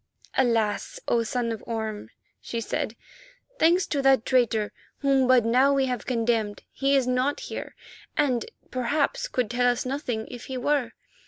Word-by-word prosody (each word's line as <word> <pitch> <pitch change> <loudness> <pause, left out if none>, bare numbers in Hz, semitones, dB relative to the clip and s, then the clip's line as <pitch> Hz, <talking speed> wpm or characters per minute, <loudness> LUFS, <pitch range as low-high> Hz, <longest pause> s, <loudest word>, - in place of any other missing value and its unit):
"Alas! 225 -5 +1
O 235 - +3
Son 230 +1 -1
of 225 - -5
Orme," 220 -2 -4 0.3
she 235 - -4
said, 225 0 -3 0.6
"thanks 345 +4 +4
to 285 - -1
that 270 -3 +4
traitor 230 -5 +2 0.3
whom 270 -2 +3
but 250 -3 +5
now 255 +4 +4
we 270 -1 +3
have 250 -3 -3
condemned, 230 -4 0
he 275 0 +1
is 270 -2 +3
not 255 +3 +1
here - - -6 0.4
and, 260 -6 +1 0.2
perhaps, 290 - 0
could 250 - -1
tell 245 0 +3
us 245 +1 -3
nothing 255 -5 -3
if 245 -1 -8
he 260 - -5
were. 255 -2 0
250 Hz, 160 wpm, -26 LUFS, 230-270 Hz, 0.6 s, but